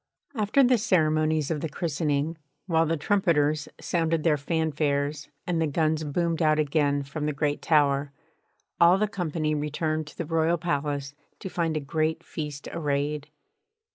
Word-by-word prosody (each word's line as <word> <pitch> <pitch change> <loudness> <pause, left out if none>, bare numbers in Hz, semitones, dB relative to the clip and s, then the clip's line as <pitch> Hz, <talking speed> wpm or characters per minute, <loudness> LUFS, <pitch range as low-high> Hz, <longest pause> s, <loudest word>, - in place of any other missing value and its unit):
After 220 +3 +3
the 250 -2 +4
ceremonies 155 -6 +2
of 150 -3 -2
the 160 - -2
christening, 155 0 -1 0.3
while 165 -3 +2
the 165 +1 0
trumpeters 155 -4 +1
sounded 165 -2 0
their 160 -3 +4
fanfares 145 -1 -1 0.2
and 170 -2 0
the 160 - +2
guns 155 +1 +1
boomed 165 +3 -1
out 155 -1 +4
again 145 -1 +1
from 150 +2 -4
the 150 - -1
great 145 +1 -1
tower, 145 -2 +2 0.7
all 170 +2 +6
the 215 +2 +1
company 160 -6 -2
returned 155 +1 -2
to - - -13
the 170 - -3
Royal 165 +2 +1
Palace 145 -4 -2 0.2
to 190 - -7
find 165 -3 -1
a - - 0
great 155 +3 -1
feast 150 -2 -6
arrayed. 145 -1 -2
155 Hz, 155 wpm, -26 LUFS, 145-165 Hz, 0.7 s, all